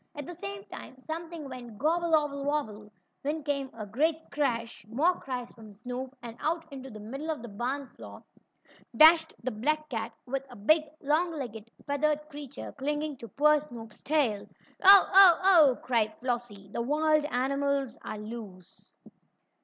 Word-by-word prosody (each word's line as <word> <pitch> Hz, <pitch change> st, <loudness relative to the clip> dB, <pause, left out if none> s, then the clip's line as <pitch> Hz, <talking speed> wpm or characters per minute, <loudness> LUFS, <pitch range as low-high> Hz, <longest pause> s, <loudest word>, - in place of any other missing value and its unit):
At 290 Hz, -1 st, -6 dB
the 350 Hz, -, -7 dB
same 200 Hz, -8 st, -7 dB
time 235 Hz, +5 st, -10 dB
something 320 Hz, +1 st, -6 dB
went: 245 Hz, -4 st, -9 dB
"Gobble 330 Hz, +5 st, +1 dB
obblcobble!" 280 Hz, -8 st, -2 dB, 0.3 s
Then 300 Hz, +2 st, -3 dB
came 280 Hz, -2 st, -2 dB
a 220 Hz, -2 st, -7 dB
great 310 Hz, +10 st, -1 dB
crash, 235 Hz, -6 st, -2 dB
more 320 Hz, +10 st, +2 dB
cries 250 Hz, -2 st, -5 dB
from 215 Hz, -3 st, -14 dB
Snoop 250 Hz, +4 st, -6 dB
and 230 Hz, -1 st, -7 dB
out 330 Hz, +1 st, -1 dB
into 265 Hz, -1 st, -8 dB
the 215 Hz, -3 st, -10 dB
middle 270 Hz, +9 st, -6 dB
of 305 Hz, -7 st, -3 dB
the -, -, -6 dB
barn 245 Hz, +7 st, -3 dB
floor -, -, -12 dB, 0.7 s
dashed 320 Hz, +1 st, +7 dB
the 255 Hz, -, -1 dB
black 305 Hz, +8 st, -1 dB
cat 225 Hz, -2 st, -3 dB
with 270 Hz, +1 st, -3 dB
a 245 Hz, -, -11 dB
big, 305 Hz, +10 st, +3 dB, 0.2 s
long 310 Hz, +5 st, +2 dB
legged, 230 Hz, -8 st, -7 dB, 0.2 s
feathered 300 Hz, +1 st, 0 dB
creature 285 Hz, -2 st, -8 dB
clinging 295 Hz, +1 st, -2 dB
to 230 Hz, -, -9 dB
poor 300 Hz, +6 st, +4 dB
Snoop's 235 Hz, -7 st, -10 dB
tail. 270 Hz, -9 st, 0 dB, 0.3 s
"Oh! 395 Hz, 0 st, +9 dB
Oh! 375 Hz, -3 st, +9 dB
Oh!" 325 Hz, -9 st, +7 dB
cried 220 Hz, -3 st, 0 dB
Flossie. 235 Hz, -6 st, -4 dB
"The -, -, -1 dB
wild 305 Hz, +4 st, +2 dB
animals 275 Hz, -1 st, -1 dB
are 215 Hz, -, -6 dB
loose!" 210 Hz, -4 st, -10 dB
275 Hz, 160 wpm, -29 LUFS, 230-305 Hz, 0.7 s, Oh